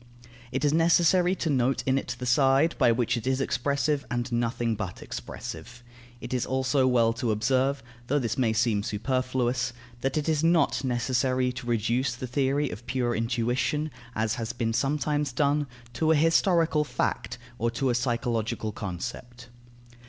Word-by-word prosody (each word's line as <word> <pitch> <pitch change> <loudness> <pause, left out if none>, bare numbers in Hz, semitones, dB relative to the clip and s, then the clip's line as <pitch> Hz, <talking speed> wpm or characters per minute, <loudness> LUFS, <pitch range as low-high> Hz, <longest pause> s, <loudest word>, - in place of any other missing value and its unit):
It 135 +3 -1
is 145 - +3
necessary 170 +2 +4
to 165 - -2
note 130 0 +1
in 135 +1 +2
it 125 -2 -5
the 125 - -5
side 135 +5 +4
by 120 - +5
which 120 +1 +1
it 120 +2 -5
is 130 0 +1
expressive, 140 +3 0
and 120 +1 -2
nothing 120 0 0
but 95 -3 -5
expressive. 120 +10 -8 0.4
It 120 +1 -6
is 125 - 0
also 130 +1 +1
well 115 -3 +3
to 120 0 -2
observe 130 +5 +1 0.2
(though 145 - +2
this 115 -5 -1
may 120 -4 +2
seem 110 -2 +1
superfluous) 125 +2 -1 0.3
that 135 +4 -1
it 150 - -1
is 155 -1 +1
not 165 -5 +3
necessary 130 0 +1
to 125 0 -8
reduce 120 +2 0
the 125 - -5
theory 135 +2 0
of 110 +7 -9
pure 120 -1 0
intuition, 125 +6 0 0.2
as 110 0 0
has 115 +1 -3
been 115 -2 -1
sometimes 145 +3 0
done, 145 +3 +1 0.3
to 155 +7 0
a 160 - +5
historical 165 0 +3
fact 145 - -2 0.2
or 115 +1 +1
to 125 +2 0
a - - +1
psychological 115 -2 -1
concept. 120 +5 -7
125 Hz, 165 wpm, -27 LUFS, 120-140 Hz, 0.4 s, by